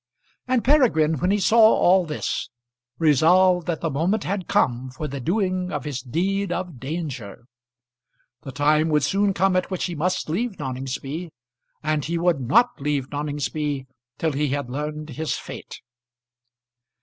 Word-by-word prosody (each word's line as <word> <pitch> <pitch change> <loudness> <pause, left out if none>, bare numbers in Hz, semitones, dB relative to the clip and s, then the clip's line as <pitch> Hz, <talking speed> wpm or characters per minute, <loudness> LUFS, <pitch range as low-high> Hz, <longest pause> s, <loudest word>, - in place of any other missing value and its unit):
And 255 -2 +1
Peregrine, 190 - +3
when 180 - +1
he 205 - +3
saw 220 +4 +3
all 190 -5 +5
this, 150 - -3 0.5
resolved 175 +4 +4
that 170 -3 -2
the 165 - -1
moment 175 +9 0
had 195 -1 -3
come 125 +1 +1
for 130 +4 -5
the 140 0 -5
doing 185 - -1
of 145 -3 -3
his 140 -4 -3
deed 190 +9 -1
of 175 -7 -4
danger. 135 - -5 1.0
The 135 - -8
time 150 +3 +2
would 150 -2 +2
soon 200 +7 +2
come 190 +1 +2
at 185 - 0
which 185 -2 -2
he 180 - -3
must 180 +4 -1
leave 195 +6 -2
Noningsby, 135 +5 -5 0.5
and 155 -1 0
he 170 +4 -2
would 170 -3 +2
not 225 - +2
leave 140 -2 -1
Noningsby 145 -1 -2 0.3
till 160 - 0
he 150 +1 0
had 140 -2 -3
learned 150 +2 -4
his 155 +4 -2
fate. - - -9
155 Hz, 155 wpm, -23 LUFS, 145-185 Hz, 1.0 s, all